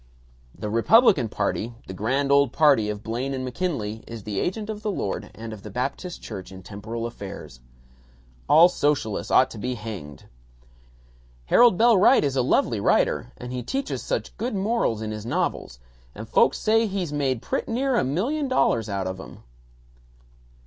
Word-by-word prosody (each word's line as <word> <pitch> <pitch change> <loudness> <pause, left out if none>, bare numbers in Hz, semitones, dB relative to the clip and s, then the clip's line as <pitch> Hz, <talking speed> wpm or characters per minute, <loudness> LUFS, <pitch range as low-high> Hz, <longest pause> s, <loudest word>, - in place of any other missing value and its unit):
The 105 - -4
Republican 140 - +4
Party, 115 +3 -2
the 95 - -7
Grand 130 +9 0
Old 140 -3 +4
Party 140 -9 +4
of 105 0 -5
Blaine 125 +5 -3
and 130 0 -4
McKinley, 125 - -3
is 115 -3 -8
the 100 -2 -3
agent 210 +4 -2
of 215 -1 -5
the 215 - -2
Lord 105 - -3
and 110 0 -7
of 105 - -10
the 105 - -9
Baptist 135 - -4
Church 95 -5 -8
in 95 -1 -11
temporal 110 +4 -6
affairs. 100 - -8 0.9
All 165 +3 +8
socialists 145 - -1
ought 130 - +4
to 110 - -8
be 125 +4 -3
hanged. 100 - -8 1.2
"Harold 235 - +5
Bell 230 -3 +5
Wright 245 +7 +5
is 140 -2 0
a 130 - +3
lovely 120 -3 +1
writer, - - +1
and 125 0 -7
he 125 - -3
teaches 270 - -3
such - - -3
good 235 -1 -3
morals 195 - 0
in 110 - -4
his 105 -1 -6
novels, 85 - -2 0.4
and - - -8
folks - - +3
say 225 +1 +2
he's 190 -6 -3
made 135 -5 -1
prett' - - -2
near 260 +3 0
a - - +2
million 235 - -1
dollars 115 - +1
out 100 -1 -2
of 95 0 -4
'em." - - -11
125 Hz, 175 wpm, -24 LUFS, -, 1.2 s, All